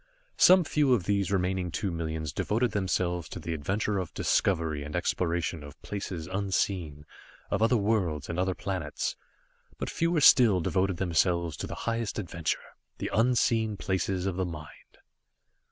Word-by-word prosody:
Some 185 Hz, 0 st, +7 dB
few 145 Hz, -5 st, +3 dB
of 100 Hz, -, -2 dB
these 100 Hz, -1 st, 0 dB
remaining 95 Hz, -1 st, 0 dB
two 95 Hz, +3 st, -2 dB
millions 80 Hz, -2 st, -3 dB
devoted 115 Hz, +2 st, 0 dB
themselves 90 Hz, -3 st, -1 dB
to -, -, -7 dB
the 85 Hz, -, -4 dB
adventure 100 Hz, +6 st, -1 dB
of 90 Hz, -, -4 dB
discovery 80 Hz, -6 st, +1 dB
and 75 Hz, +1 st, -6 dB
exploration 85 Hz, -2 st, -1 dB
of 70 Hz, 0 st, -12 dB
places 95 Hz, -5 st, -5 dB
unseen, 95 Hz, -5 st, -2 dB, 0.5 s
of 100 Hz, -, 0 dB
other 115 Hz, +2 st, +4 dB
worlds 100 Hz, -9 st, 0 dB
and 85 Hz, -, -3 dB
other 95 Hz, 0 st, 0 dB
planets. 90 Hz, -7 st, -3 dB, 0.6 s
But -, -, -4 dB
fewer 170 Hz, -1 st, +1 dB
still 120 Hz, -9 st, +7 dB
devoted 95 Hz, +1 st, 0 dB
themselves 85 Hz, -2 st, +1 dB
to -, -, -4 dB
the -, -, -6 dB
highest 115 Hz, -2 st, -2 dB
adventure, 85 Hz, -5 st, -3 dB, 0.2 s
the -, -, -4 dB
unseen 115 Hz, -2 st, +2 dB
places 95 Hz, -1 st, -1 dB
of 95 Hz, -2 st, -2 dB
the 95 Hz, -, +1 dB
mind. 75 Hz, -3 st, -10 dB
95 Hz, 155 wpm, -28 LUFS, 85-105 Hz, 0.6 s, Some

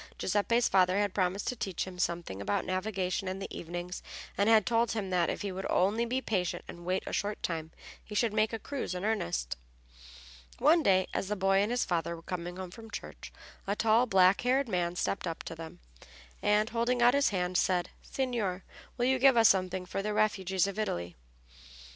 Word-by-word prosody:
Giuseppe's 220 Hz, +5 st, +2 dB
father 185 Hz, 0 st, +3 dB
had 205 Hz, -2 st, +1 dB
promised 190 Hz, +1 st, 0 dB
to 250 Hz, -, -3 dB
teach 195 Hz, -6 st, -3 dB
him 185 Hz, -1 st, -9 dB
something 170 Hz, -, -2 dB
about 100 Hz, +1 st, -1 dB
navigation 185 Hz, 0 st, -2 dB
in 185 Hz, +1 st, -3 dB
the 195 Hz, -, -7 dB
evenings, 175 Hz, +2 st, -5 dB, 0.3 s
and 200 Hz, +2 st, +2 dB
had 220 Hz, -2 st, +6 dB
told 235 Hz, -1 st, +2 dB
him 200 Hz, -4 st, -3 dB
that, 175 Hz, -3 st, +2 dB
if -, -, -3 dB
he 200 Hz, -, -2 dB
would 190 Hz, +1 st, -4 dB
only 205 Hz, +6 st, +2 dB
be 255 Hz, +2 st, -1 dB
patient 185 Hz, -8 st, -2 dB
and 175 Hz, 0 st, -10 dB
wait 185 Hz, +1 st, 0 dB
a -, -, -6 dB
short 205 Hz, +1 st, -2 dB
time, 160 Hz, -2 st, -2 dB, 0.3 s
he 210 Hz, -, -9 dB
should 225 Hz, 0 st, +2 dB
make 215 Hz, 0 st, +2 dB
a 225 Hz, -, -2 dB
cruise 235 Hz, -5 st, -4 dB
in 180 Hz, +2 st, -3 dB
earnest. 75 Hz, -, -1 dB, 1.0 s
One 325 Hz, +3 st, +5 dB
day, 190 Hz, -8 st, +3 dB
as -, -, -2 dB
the 210 Hz, -, -1 dB
boy 195 Hz, 0 st, +2 dB
and 205 Hz, +2 st, +2 dB
his 245 Hz, +1 st, 0 dB
father 170 Hz, -1 st, -1 dB
were 165 Hz, -, -12 dB
coming 175 Hz, 0 st, -5 dB
home 185 Hz, -2 st, -6 dB
from 225 Hz, +3 st, -11 dB
church 205 Hz, -, -8 dB, 0.4 s
a 200 Hz, -, 0 dB
tall, 225 Hz, +3 st, +3 dB
black 190 Hz, -2 st, +5 dB
haired 260 Hz, +2 st, +2 dB
man 175 Hz, -4 st, -1 dB
stepped 185 Hz, +1 st, -2 dB
up 165 Hz, -, -4 dB
to -, -, -6 dB
them, 165 Hz, 0 st, -9 dB, 0.6 s
and, 210 Hz, +2 st, +2 dB
holding 240 Hz, +1 st, +1 dB
out 245 Hz, +1 st, +6 dB
his 280 Hz, 0 st, +3 dB
hand, 180 Hz, -2 st, -2 dB
said, 180 Hz, -1 st, +1 dB
"Signor, 225 Hz, -9 st, -2 dB, 0.3 s
will 245 Hz, -, +1 dB
you 260 Hz, 0 st, +2 dB
give 265 Hz, -1 st, +6 dB
us 225 Hz, -2 st, +7 dB
something 185 Hz, -1 st, +1 dB
for 195 Hz, -, -3 dB
the 210 Hz, +1 st, -2 dB
refugees 190 Hz, -3 st, +1 dB
of 200 Hz, +1 st, -4 dB
Italy?" 85 Hz, -, -2 dB
195 Hz, 205 wpm, -30 LUFS, 180-225 Hz, 1.0 s, us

